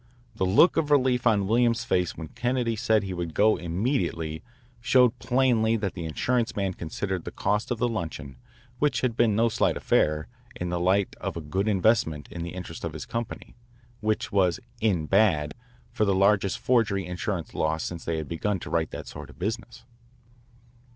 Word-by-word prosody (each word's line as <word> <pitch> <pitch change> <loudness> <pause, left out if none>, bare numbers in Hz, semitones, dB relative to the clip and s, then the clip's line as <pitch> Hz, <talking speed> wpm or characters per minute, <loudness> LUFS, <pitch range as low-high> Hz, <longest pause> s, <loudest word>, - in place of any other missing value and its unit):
The 95 -4 0
look 105 - +5
of 150 -2 +1
relief 130 -4 +3
on 105 -4 +3
Williams's 115 +2 +2
face 90 -1 0
when 80 -2 -7
Kennedy 120 -1 -1
said 110 -1 +2
he 95 -1 -4
would 85 -3 -4
go 110 +1 +4
immediately 85 - -2 0.4
showed 125 +1 +3
plainly 120 -3 +2
that 100 -3 -2
the 85 -3 -6
insurance 120 +9 0
man 95 -2 -1
considered 90 +2 -4
the - - -5
cost 105 +2 -1
of 120 - -1
the 125 - +1
luncheon, 80 - -5 0.4
which 150 -1 +1
had 125 -3 0
been 115 -3 +3
no 115 +2 +3
slight 115 - +1
affair, 75 0 +1 0.3
in 90 - -4
the 90 0 -1
light 95 +3 +1
of - - -3
a - - -2
good 95 +7 -2
investment 95 -7 +2
in 85 - -6
the 85 +1 -5
interest 85 -3 -7
of 85 -2 -3
his 75 - -6
company, 115 -1 -5 0.4
which 110 0 -1
was 95 0 +2 0.2
"in 95 -8 +1
bad" 85 -6 +2 0.4
for - - 0
the 100 -2 +2
largest 100 0 +3
forgery 110 -6 +1
insurance 90 -1 -4
loss 80 +1 0
since 85 -2 -5
they 85 -1 -2
had 80 -2 -4
begun 95 +5 -1
to - - -7
write 80 -1 +1
that - - -7
sort - - -9
of - - -15
business. 115 +6 -5
100 Hz, 185 wpm, -26 LUFS, 85-115 Hz, 0.4 s, look